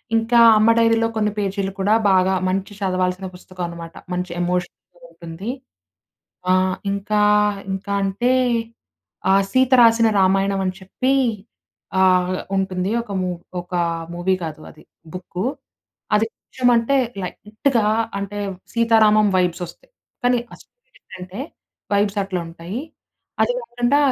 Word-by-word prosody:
ఇంకా 225 Hz, +1 st, +3 dB, 0.2 s
'అమ్మ 215 Hz, +1 st, +4 dB
డైరీలో 230 Hz, 0 st, +3 dB
కొన్ని 210 Hz, -1 st, +1 dB
పేజీలు' 195 Hz, -1 st, -2 dB
కూడా 200 Hz, +2 st, +2 dB, 0.2 s
బాగా 190 Hz, 0 st, +3 dB, 0.2 s
మంచి 195 Hz, +2 st, -2 dB
చదవాల్సిన 185 Hz, 0 st, -1 dB
పుస్తకం 180 Hz, 0 st, -8 dB
అనమాట. 170 Hz, -1 st, -9 dB, 0.2 s
మంచి 180 Hz, 0 st, -3 dB
ఎమోషన్ 180 Hz, 0 st, -1 dB, 0.4 s
ఉంటుంది. 170 Hz, +6 st, -8 dB, 1.0 s
ఆహ్, 185 Hz, 0 st, +2 dB, 0.2 s
ఇంకా 210 Hz, +1 st, 0 dB, 0.5 s
ఇంకా 195 Hz, +1 st, -3 dB
అంటే 205 Hz, +6 st, 0 dB, 1.0 s
ఆహ్, 195 Hz, +1 st, +5 dB
'సీత 260 Hz, 0 st, +3 dB
రాసిన 230 Hz, -1 st, +6 dB
రామాయణం 195 Hz, +1 st, +2 dB
అని 185 Hz, -, -1 dB
చెప్పి 255 Hz, +8 st, -1 dB, 0.9 s
ఆహ్, 185 Hz, -1 st, +3 dB, 0.2 s
ఉంటుంది. 190 Hz, 0 st, -1 dB
ఒక 210 Hz, -, -11 dB
మూ 185 Hz, -, -1 dB, 0.3 s
ఒకా 175 Hz, 0 st, -2 dB, 0.3 s
మూవీ 185 Hz, +2 st, +1 dB
కాదు 155 Hz, -1 st, -6 dB
అది 155 Hz, -, -18 dB, 0.3 s
బుక్కు. 185 Hz, +2 st, -5 dB, 0.7 s
అది 215 Hz, +1 st, +3 dB
కృష్ణం 255 Hz, -1 st, -1 dB
అంటే 250 Hz, +4 st, +2 dB, 0.3 s
లైట్‌గా 215 Hz, +5 st, -1 dB, 0.3 s
అంటే 200 Hz, +1 st, -5 dB, 0.3 s
సీతారామం 220 Hz, -2 st, +4 dB
వైబ్స్ 180 Hz, -1 st, 0 dB
ఒస్తాయి. 175 Hz, -, -16 dB, 0.3 s
కానీ 245 Hz, 0 st, +3 dB
అసలు -, -, -16 dB
విషయం -, -, -26 dB
ఎంటంటే 185 Hz, +3 st, -9 dB, 0.5 s
వైబ్స్ 205 Hz, 0 st, +1 dB
అట్లా 190 Hz, -2 st, -3 dB
ఉంటాయి. 170 Hz, +6 st, -7 dB, 0.6 s
అది -, -, +3 dB
కాకుండా 245 Hz, -, 0 dB
195 Hz, 125 wpm, -21 LUFS, 185-225 Hz, 1.0 s, రాసిన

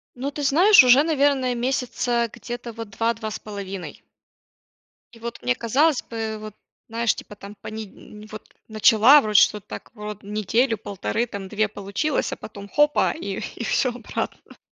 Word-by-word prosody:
Ну, 270 Hz, +3 st, -4 dB
ты 295 Hz, -, -6 dB
знаешь, 345 Hz, +4 st, +7 dB
уже, 255 Hz, +4 st, +7 dB
наверное, 280 Hz, -5 st, +2 dB
месяца 240 Hz, -1 st, -1 dB
где-то, 240 Hz, -1 st, -7 dB
вот, 225 Hz, -1 st, -8 dB
2-2,5. 210 Hz, -3 st, -4 dB, 1.1 s
И 230 Hz, -, -15 dB
вот, 235 Hz, +1 st, -7 dB
мне 125 Hz, 0 st, +1 dB
казалось 275 Hz, +5 st, +2 dB
бы, 220 Hz, -1 st, -5 dB
вот, 215 Hz, -1 st, -9 dB, 0.3 s
знаешь, 230 Hz, 0 st, 0 dB
типа 210 Hz, -, -10 dB
там 205 Hz, +1 st, -11 dB
пониднь 215 Hz, 0 st, -10 dB
вот, 215 Hz, -, -11 dB
начала 225 Hz, +5 st, +6 dB
вроде 210 Hz, -2 st, +4 dB
что-то, 210 Hz, -2 st, +2 dB
так, 105 Hz, 0 st, -9 dB
врод 210 Hz, -1 st, -8 dB
неделю 215 Hz, +4 st, 0 dB
1,5, 205 Hz, +4 st, -3 dB
там 200 Hz, -3 st, -7 dB
2 215 Hz, +2 st, 0 dB
получилось, 205 Hz, +9 st, -2 dB
а -, -, -4 dB
потом 200 Hz, -1 st, -10 dB
хопа, 295 Hz, +5 st, +2 dB
и 200 Hz, -11 st, -5 dB, 0.2 s
и -, -, -5 dB
всё 250 Hz, +2 st, +1 dB
обратно. 245 Hz, +1 st, -6 dB
225 Hz, 150 wpm, -23 LUFS, 210-255 Hz, 1.1 s, знаешь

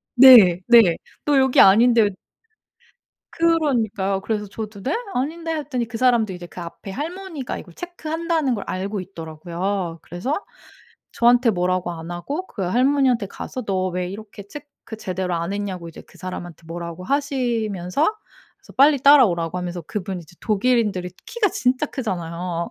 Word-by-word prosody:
네. 235 Hz, -9 st, +9 dB
네. 225 Hz, -9 st, +6 dB, 0.3 s
"너 290 Hz, -2 st, +3 dB
여기 265 Hz, -1 st, +3 dB
아닌데" 225 Hz, +2 st, +6 dB, 1.2 s
그러니까요. 235 Hz, -13 st, +1 dB
그래서 210 Hz, 0 st, -2 dB
저도 210 Hz, 0 st, -7 dB
"네? 275 Hz, -, -1 dB, 0.2 s
아닌데." 325 Hz, +5 st, -2 dB
했더니 270 Hz, -6 st, -3 dB
그 225 Hz, -1 st, -6 dB
사람도 235 Hz, -5 st, +2 dB
이제 175 Hz, -1 st, -8 dB
그 180 Hz, -, -11 dB
앞에 170 Hz, +3 st, -8 dB
할머니가 320 Hz, -, -5 dB
이걸 175 Hz, -, -11 dB
체크한다는 325 Hz, -4 st, -2 dB
걸 205 Hz, -, -5 dB
알고 195 Hz, +2 st, -3 dB
있더라고요. 170 Hz, +1 st, -4 dB
그래서 255 Hz, -, -3 dB, 0.7 s
저한테 240 Hz, 0 st, +4 dB
뭐라고 180 Hz, -2 st, -1 dB
안 165 Hz, 0 st, -8 dB
하고 285 Hz, -, -4 dB
그 200 Hz, -, -6 dB
할머니한테 250 Hz, +2 st, +2 dB
가서 255 Hz, +5 st, -7 dB
너 185 Hz, -2 st, -1 dB
왜 180 Hz, 0 st, -3 dB
이렇게 205 Hz, 0 st, -10 dB
체크 285 Hz, -2 st, -11 dB
제대로 185 Hz, -2 st, -3 dB
안 170 Hz, +3 st, -2 dB
했냐고 190 Hz, -4 st, -4 dB
이제 165 Hz, -, -11 dB
그 -, -, -21 dB
사람한테 175 Hz, -3 st, -7 dB
뭐라고 170 Hz, +1 st, -7 dB
하시면서 240 Hz, -, -1 dB, 0.6 s
그래서 -, -, -17 dB
빨리 280 Hz, +1 st, +6 dB
따라오라고 200 Hz, -, +5 dB
하면서 180 Hz, 0 st, -4 dB
그분이 190 Hz, +2 st, -5 dB
이제 165 Hz, +2 st, -19 dB
독일인들이 210 Hz, -4 st, +1 dB, 0.2 s
키가 455 Hz, -4 st, +1 dB
진짜 255 Hz, +2 st, 0 dB
크잖아요. 175 Hz, -, -4 dB
210 Hz, 350 characters per minute, -22 LUFS, 180-265 Hz, 1.2 s, 네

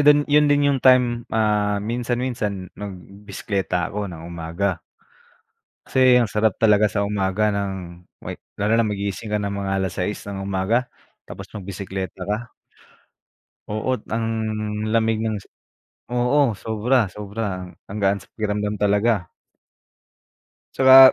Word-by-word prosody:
dun 145 Hz, 0 st, +6 dB
yun 150 Hz, 0 st, +4 dB
din 145 Hz, 0 st, +4 dB
yung 135 Hz, -, -1 dB
time, 125 Hz, -2 st, +5 dB
hmm, -, -, -3 dB
ah, 105 Hz, -2 st, +2 dB
minsan-minsan, 115 Hz, -3 st, -2 dB
mm, -, -, -55 dB
mag 100 Hz, -1 st, -4 dB
b 100 Hz, +3 st, -15 dB
bisekleta 95 Hz, -4 st, -1 dB
ako 105 Hz, 0 st, -3 dB
ng 85 Hz, -1 st, -9 dB
umaga. 85 Hz, +2 st, -2 dB, 1.1 s
Kasi 130 Hz, -1 st, +5 dB
ang 115 Hz, -, +1 dB
sarap 105 Hz, -1 st, +1 dB
talaga 105 Hz, -1 st, +5 dB
sa 100 Hz, -1 st, +1 dB
umaga 100 Hz, +1 st, +1 dB
nang 95 Hz, -4 st, -4 dB, 0.2 s
wek -, -, -6 dB, 0.2 s
lalo 105 Hz, +2 st, +2 dB
na 115 Hz, -, +3 dB
magigising 100 Hz, 0 st, -3 dB
ka 105 Hz, -, +1 dB
ng 100 Hz, 0 st, -2 dB
mga 95 Hz, -, -2 dB
6:00 95 Hz, +2 st, -2 dB
ng 100 Hz, -, -4 dB
umaga, 100 Hz, +6 st, +1 dB, 0.4 s
tapos, 95 Hz, +1 st, -9 dB
magbiseklata 95 Hz, -2 st, -5 dB
ka 110 Hz, +3 st, -3 dB, 1.2 s
Oo't, 110 Hz, +4 st, -1 dB
ang 115 Hz, +1 st, -1 dB, 0.6 s
lamig 110 Hz, 0 st, +2 dB
ng 110 Hz, -1 st, -1 dB
si 100 Hz, -, -9 dB, 0.7 s
oo, 125 Hz, +1 st, +3 dB
sobra 110 Hz, +3 st, +1 dB
sobra 100 Hz, -2 st, -4 dB, 0.2 s
ang 105 Hz, -, -4 dB
gaan 100 Hz, 0 st, +2 dB
sa -, -, -21 dB
pakiramdam 105 Hz, -1 st, -2 dB
talaga. 105 Hz, -2 st, +2 dB, 1.4 s
Tsaka 130 Hz, 0 st, +9 dB
105 Hz, 140 wpm, -22 LUFS, 100-115 Hz, 1.4 s, Tsaka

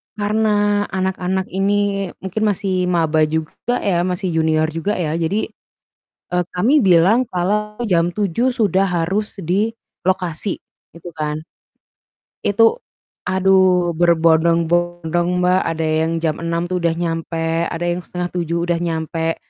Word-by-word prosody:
karena 205 Hz, -1 st, +1 dB
anak-anak 190 Hz, 0 st, -2 dB
ini 195 Hz, +1 st, 0 dB, 0.2 s
mungkin 205 Hz, +3 st, -2 dB
masih 190 Hz, -3 st, 0 dB
maba 160 Hz, -3 st, +2 dB
juga 160 Hz, +10 st, -2 dB
ya 175 Hz, -4 st, +1 dB
masih 185 Hz, +1 st, -2 dB
junior 160 Hz, -1 st, +2 dB
juga 165 Hz, +5 st, -2 dB
ya 160 Hz, -2 st, -1 dB
jadi, 170 Hz, +6 st, -1 dB, 0.8 s
e 180 Hz, -, -3 dB, 0.2 s
kami 250 Hz, +11 st, +3 dB
bilang 190 Hz, +5 st, +5 dB
kalau 210 Hz, +4 st, -1 dB
jam 175 Hz, -3 st, +2 dB
7.00 210 Hz, +6 st, 0 dB
sudah 210 Hz, -7 st, +1 dB
harus 195 Hz, +3 st, -1 dB
di 195 Hz, +5 st, 0 dB, 0.4 s
lokasi 185 Hz, 0 st, -1 dB, 0.4 s
gitu 170 Hz, +1 st, -13 dB
kan. 150 Hz, 0 st, -2 dB, 1.1 s
Itu 225 Hz, -, +4 dB, 0.5 s
aduh 185 Hz, -2 st, +3 dB
berbondong-bondong 170 Hz, +1 st, +2 dB
Mbak, 180 Hz, +1 st, +3 dB
ada 165 Hz, -1 st, -2 dB
yang 160 Hz, +1 st, +1 dB
jam 160 Hz, -2 st, 0 dB
6.00 170 Hz, 0 st, -1 dB
tuh 185 Hz, -, -1 dB
udah 170 Hz, -1 st, +1 dB
nyampe, 165 Hz, 0 st, -2 dB
ada 170 Hz, 0 st, -3 dB
yang 175 Hz, +1 st, -1 dB
6.30 175 Hz, -1 st, -3 dB
udah 170 Hz, -, +2 dB
nyampe. 165 Hz, 0 st, -2 dB
175 Hz, 125 wpm, -19 LUFS, 165-195 Hz, 1.1 s, bilang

